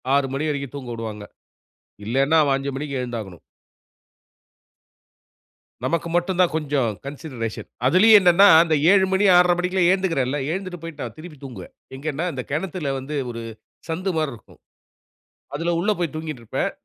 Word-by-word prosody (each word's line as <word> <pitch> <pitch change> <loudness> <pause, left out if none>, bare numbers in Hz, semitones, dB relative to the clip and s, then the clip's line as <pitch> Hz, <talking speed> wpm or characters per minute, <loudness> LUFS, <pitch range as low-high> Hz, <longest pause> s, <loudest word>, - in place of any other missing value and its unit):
6 140 -1 +2
மணி 155 +3 -1
வரைக்கும் 140 -1 -4
தூங்க 125 -3 -7
உடுவாங்க. 110 -2 -6 0.8
இல்லேன்னா, 135 +7 +2
அவன் 140 -2 +2
5 140 +1 -4
மணிக்கு 140 -2 -4
எழுந்தாகணும். 110 -8 -6 2.4
நமக்கு 170 0 -1
மட்டுந்தான் 175 -1 +1
கொஞ்சம் 140 -6 0 0.2
கன்சிடரேஷன் 130 -6 -6 0.2
அதுலேயும் 210 +8 +7
என்னன்னா, 185 +2 +6 0.2
அந்த 160 -2 +1 0.2
7:00 190 -1 +5
மணி, 195 +2 +2
6:30 180 0 +5
மணிக்கெல்லாம் 180 0 +1
ஏழுந்துக்குறேன்ல, 165 -8 0
எழுந்துட்டு 185 -1 -4
போயிட்டு 165 -4 -7
நான் 115 -2 -8
திருப்பி 155 -2 -11
தூங்குவேன். 120 -9 -9 0.2
எங்கேன்னா, 155 +4 -3
இந்த 125 - -5
கிணத்துல 155 -1 -2
வந்து 140 +3 -6
ஒரு 115 0 -6 0.5
சந்து 185 +4 -2
மாரி 155 -3 -1
இருக்கும். 110 - -18 0.9
அதுல 165 +4 -1
உள்ள 210 +4 +1
போய் 165 -4 -2
தூங்கிட்ருப்பேன். 155 -8 -3
150 Hz, 140 wpm, -22 LUFS, 135-175 Hz, 2.4 s, அதுலேயும்